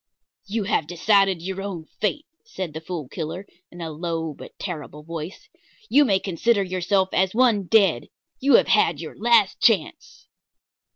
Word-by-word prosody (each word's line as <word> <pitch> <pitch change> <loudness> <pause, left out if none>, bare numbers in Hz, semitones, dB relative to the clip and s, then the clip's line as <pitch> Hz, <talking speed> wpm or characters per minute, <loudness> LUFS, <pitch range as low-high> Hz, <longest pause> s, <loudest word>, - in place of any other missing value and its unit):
"You 215 +1 -2
have 160 -6 0
decided 190 0 +2
your 190 +1 -4
own 190 -5 -6
fate," 295 +9 -1 0.2
said 185 - -6
the 160 - -6
Fool 160 -4 -6
Killer, 165 +6 -6 0.2
in 175 - -11
a 165 -1 -4
low 165 0 -3
but - - -13
terrible 150 -5 -7
voice. 165 - -7 0.4
"You 290 +2 +5
may 200 -6 +3
consider 200 +4 +1
yourself 185 +1 0
as 190 +2 +1
one 230 -5 +3
dead. 195 - +3 0.3
You 275 -1 +4
have - - +4
had 170 -7 +3
your 160 -1 -8
last 225 -3 +3
chance." 200 -9 0
190 Hz, 160 wpm, -23 LUFS, 165-210 Hz, 0.4 s, You